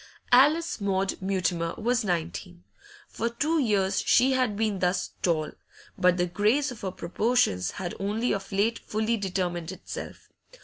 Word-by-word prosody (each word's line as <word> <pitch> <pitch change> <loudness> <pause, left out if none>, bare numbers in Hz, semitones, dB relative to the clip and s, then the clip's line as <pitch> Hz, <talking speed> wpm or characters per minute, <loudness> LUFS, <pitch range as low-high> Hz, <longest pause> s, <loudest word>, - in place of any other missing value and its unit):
Alice 295 +3 +4
Maud 195 -1 -1
Mutimer 180 -3 -1
was 245 +2 0
nineteen. 175 0 -3 0.4
For 230 - -2
two 300 +8 0
years 200 -7 +1
she 260 +2 +4
had 255 -6 +1
been 215 -3 0
thus 180 +1 0
tall, 160 -3 0 0.4
but 180 0 +3
the 175 - +2
grace 215 +10 +1
of 240 - -10
her 190 - -2
proportions 180 - 0
had 175 -2 -5
only 210 +5 -1
of 195 0 -5
late 210 +4 +1
fully 220 +2 -1
determined 180 -4 -2
itself. 190 0 -8
195 Hz, 145 wpm, -27 LUFS, 180-235 Hz, 0.4 s, Alice